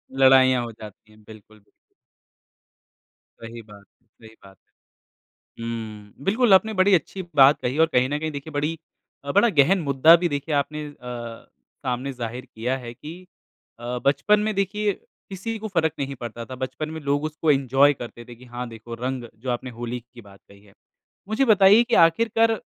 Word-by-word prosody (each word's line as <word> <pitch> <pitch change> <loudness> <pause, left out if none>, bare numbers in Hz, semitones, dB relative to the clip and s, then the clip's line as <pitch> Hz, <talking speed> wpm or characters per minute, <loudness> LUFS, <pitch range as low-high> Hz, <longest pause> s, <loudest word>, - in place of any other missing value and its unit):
लड़ाइयाँ 130 -2 +5
हो 115 - -6
जाती 105 -1 -14
है, 110 - -20
बिल्कुल। 110 -1 -16 1.8
सही 115 +1 -9
बात 105 -2 -16 0.2
है, - - -40
सही 110 -1 -18
बात 95 0 -16 1.0
है। - - -5
हुँ, 110 -3 -7
बिल्कुल 220 +1 +3
आपने 220 +3 +4
बड़ी 200 +1 +4
अच्छी 185 +4 -3
बात 140 +1 +6
कही 125 +4 -2
और 165 - +3
कहीं 125 +1 +3
न 145 - -2
कहीं 155 0 -3
देखिए 145 +2 -8
बड़ी 150 +3 -2 0.5
अ, 140 - -2
बड़ा 205 +4 +4
गहन 170 +3 +3
मुद्दा 145 +3 +6
भी - - +3
देखिए 145 +2 -2
आपने 150 +2 -2
अ, 120 -5 -9 0.4
सामने 125 +2 -2
ज़ाहिर 125 +1 -6
किया 125 +4 -2
है 120 -2 -9
कि 150 +6 -10 0.7
अ, 120 +1 -4
बचपन 210 +9 +3
में 215 +1 -1
देखिए 200 +1 0 0.4
किसी 220 +4 -5
को 220 - -5
फ़र्क 160 -5 0
नहीं 140 0 -3
पड़ता 120 -1 -7
था, 130 - -8
बचपन 130 +4 -5
में 160 - -6
लोग 145 +1 -1
उसको 155 0 0
एन्जॉय 135 +1 +3
करते 120 -2 -10
थे, 120 0 -12
कि 125 +2 -16
हाँ, 120 +1 -6
देखो 115 +1 -10
रंग 125 0 -4 0.2
जो 130 - -4
आपने 120 +1 -4
होली 120 +1 -4
की 120 - -12
बात 100 -1 -17
कही 100 0 -18
है। 100 -1 -21 0.6
मुझे 240 +5 +1
बताइए 210 0 +6
कि 240 -1 0
आखिरकार 225 +6 +2
135 Hz, 180 wpm, -23 LUFS, 120-165 Hz, 1.8 s, बात